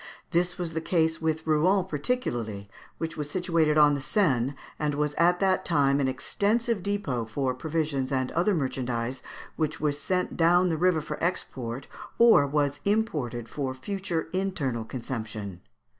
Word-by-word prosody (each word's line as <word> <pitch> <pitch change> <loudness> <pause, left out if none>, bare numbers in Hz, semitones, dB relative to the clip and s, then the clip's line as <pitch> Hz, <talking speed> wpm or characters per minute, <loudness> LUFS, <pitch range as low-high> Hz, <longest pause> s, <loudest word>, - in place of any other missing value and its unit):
This 175 +1 +1
was 175 -3 -3
the 160 - -2
case 160 -1 +1
with 160 0 -1
Rouen 175 +5 +3
particularly, 120 - -2 0.3
which 165 0 -4
was 150 -1 -3
situated 165 -3 +1
on 150 -1 +6
the 140 - -2
Seine, 135 - +1 0.2
and 150 -1 0
was 150 0 0
at 175 +3 +3
that 190 -1 +2
time 140 -5 +2
an 135 - +2
extensive 210 - 0
depôt 160 - -2
for 130 +2 -1
provisions 145 -1 -2
and 130 -1 0
other 185 +4 +2
merchandise 130 -3 -2 0.4
which 155 0 -1
was 145 -1 0
sent 180 +3 -1
down 175 +2 +4
the 165 - +1
river 175 -1 +3
for 150 - -6
export, 130 -8 -3 0.3
or 230 -12 +6
was 145 0 0
imported 150 - -1
for 130 0 -3
future 180 +3 -3
internal 160 -12 -1
consumption. 110 -6 -5
150 Hz, 155 wpm, -27 LUFS, 130-180 Hz, 0.4 s, on